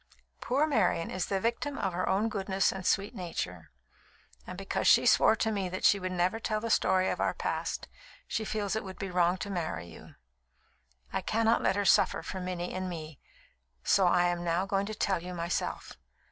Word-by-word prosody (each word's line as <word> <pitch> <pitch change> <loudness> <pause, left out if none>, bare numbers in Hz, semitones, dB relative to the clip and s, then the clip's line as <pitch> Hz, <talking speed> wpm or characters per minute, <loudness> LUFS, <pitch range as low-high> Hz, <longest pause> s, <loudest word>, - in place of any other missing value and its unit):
Poor 275 +5 +1
Marian 200 - +1
is 185 -1 -2
the 195 - 0
victim 235 +6 -2
of 190 -2 -1
her 180 +1 -1
own 200 +4 +2
goodness 195 -3 0
and 190 -1 -4
sweet 200 +3 +1
nature; 165 - -5 0.8
and - - -7
because - - -2
she - - +6
swore - - +5
to 220 0 0
me 195 -3 -2
that 185 +1 -5
she 200 - +5
would 185 0 -3
never 180 +4 0
tell 215 -1 -1
the 230 +1 -3
story 185 -2 +3
of - - -3
our - - 0
past, - - -3 0.4
she 220 - -2
feels 210 -2 -2
it 220 - -2
would 190 -1 -8
be 195 -2 -5
wrong 175 0 +2
to 200 +2 -5
marry 160 - -3
you. 85 - -13 1.0
I - - 0
cannot 225 +1 +2
let 190 - +2
her 205 0 0
suffer - - +4
for 190 - -5
Minnie 180 -1 -4
and 185 0 -3
me, 160 -4 -7 0.6
so 190 -2 +4
I 175 0 +4
am 175 0 -2
now 175 +2 0
going 195 0 -1
to 215 - -5
tell 190 -4 0
you, 180 +1 -7
myself. 170 0 -3
190 Hz, 200 wpm, -30 LUFS, 175-210 Hz, 1.0 s, she